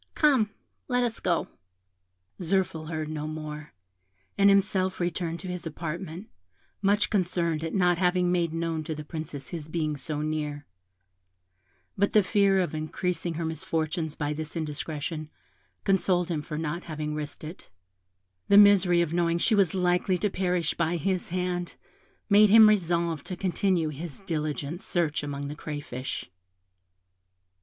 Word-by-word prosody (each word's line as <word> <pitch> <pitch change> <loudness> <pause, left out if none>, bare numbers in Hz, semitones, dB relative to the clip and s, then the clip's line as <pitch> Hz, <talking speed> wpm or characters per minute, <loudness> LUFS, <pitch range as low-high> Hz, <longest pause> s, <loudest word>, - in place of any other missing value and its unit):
Come, 265 -9 +4 0.4
let 250 -1 +2
us 235 -2 -1
go." 170 -2 0 0.9
Zirphil 175 -3 0
heard 155 -2 -3
no 155 -1 -4
more, 155 -1 -6 0.6
and 200 0 +5
himself 190 -1 +2
returned 170 -1 -2
to 190 - -7
his 180 -2 -4
apartment, 170 +4 -5 0.5
much 205 +1 +2
concerned 170 -5 0
at 165 - -3
not 180 -3 +3
having 180 -1 +2
made 170 -2 +1
known 165 -1 -2
to 160 - -3
the 150 - -6
Princess 150 -3 -6
his 160 -3 -6
being 155 -2 -1
so 145 +2 -4
near 155 -1 -1
her; 145 0 -10 1.3
but 200 +1 +1
the 210 - +6
fear 195 -1 +3
of 175 - -2
increasing 170 +2 -2
her 165 +1 -2
misfortunes 160 -1 -2
by 150 0 -2
this 155 +2 -5
indiscretion, 155 0 -4 0.5
consoled 185 -2 +2
him 160 -3 -1
for 150 0 -6
not 160 +2 -3
having 155 -1 -4
risked 150 0 -5
it; 160 +5 -9 0.8
the 200 - +6
misery 195 -4 +7
of 170 -1 -1
knowing 170 -1 +2
she 220 - +2
was 195 -4 +3
likely 180 0 +2
to 200 +3 0
perish 180 -4 0
by 170 0 0
his 185 +3 -1
hand 180 0 -2 0.5
made 210 0 +6
him 220 +1 +9
resolve 170 -6 +1
to 185 - -5
continue 185 -3 +1
his 155 +2 -7
diligent 155 -2 -3
search 165 -4 0
amongst 140 -1 -4
the 150 - -5
crayfish. 140 - -5
170 Hz, 150 wpm, -27 LUFS, 155-185 Hz, 1.3 s, him